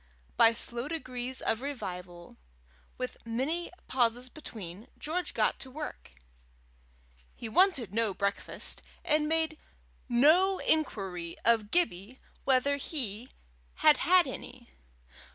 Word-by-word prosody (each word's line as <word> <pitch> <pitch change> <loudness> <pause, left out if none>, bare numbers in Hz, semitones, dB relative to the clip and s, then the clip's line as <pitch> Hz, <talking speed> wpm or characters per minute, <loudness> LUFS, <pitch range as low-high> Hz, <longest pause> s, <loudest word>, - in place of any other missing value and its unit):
By 230 - +7
slow 235 +3 -3
degrees 255 -5 -3
of 225 - 0
revival, 180 -10 -6 0.6
with 255 0 -4
many 270 +10 -1 0.2
pauses 245 0 +1
between, 215 - -8
George 355 +4 -3
got - - +2
to 265 - -6
work. 300 - -7 1.2
He 235 - -6
wanted 260 - +3
no 225 -1 +2
breakfast, 200 +1 -3 0.2
and 300 0 +3
made 320 -1 +1 0.5
no 325 +11 +5
inquiry 190 - -1
of 225 -2 +4
Gibbie 250 - +1 0.3
whether 275 +2 +3
he 250 -5 -3 0.5
had 305 -1 +6
had 360 0 +5
any. 250 -2 -8
255 Hz, 110 wpm, -30 LUFS, 225-310 Hz, 1.2 s, By